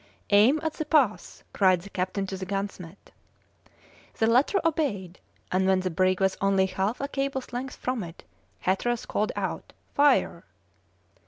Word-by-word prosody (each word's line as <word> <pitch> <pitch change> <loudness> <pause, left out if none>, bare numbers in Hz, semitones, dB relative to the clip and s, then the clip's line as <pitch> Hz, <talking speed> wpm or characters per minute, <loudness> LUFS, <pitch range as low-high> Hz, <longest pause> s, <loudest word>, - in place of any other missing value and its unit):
"Aim 220 +9 +5
at 320 -1 -1
the 310 - -4
pass!" 285 -8 +1
cried 185 -3 +3
the 200 - -11
captain 185 +2 -2
to 190 - -5
the 190 0 -6
gunsmith. 195 -2 -5 1.1
The 225 - +2
latter 255 - +3
obeyed, 210 - -1 0.3
and 190 +1 +2
when 190 -1 +3
the 185 -1 -2
brig 185 +2 +2
was 190 -1 +1
only 195 -1 +3
half 190 +4 -2
a 280 - -1
cable's 275 -2 -3
length 255 +2 -4
from 255 -2 -3
it, 170 0 -10 0.4
Hatteras 230 +6 0
called 210 - -1
out: - - -4 0.2
"Fire!" 290 0 +3
200 Hz, 155 wpm, -26 LUFS, 185-260 Hz, 1.1 s, Aim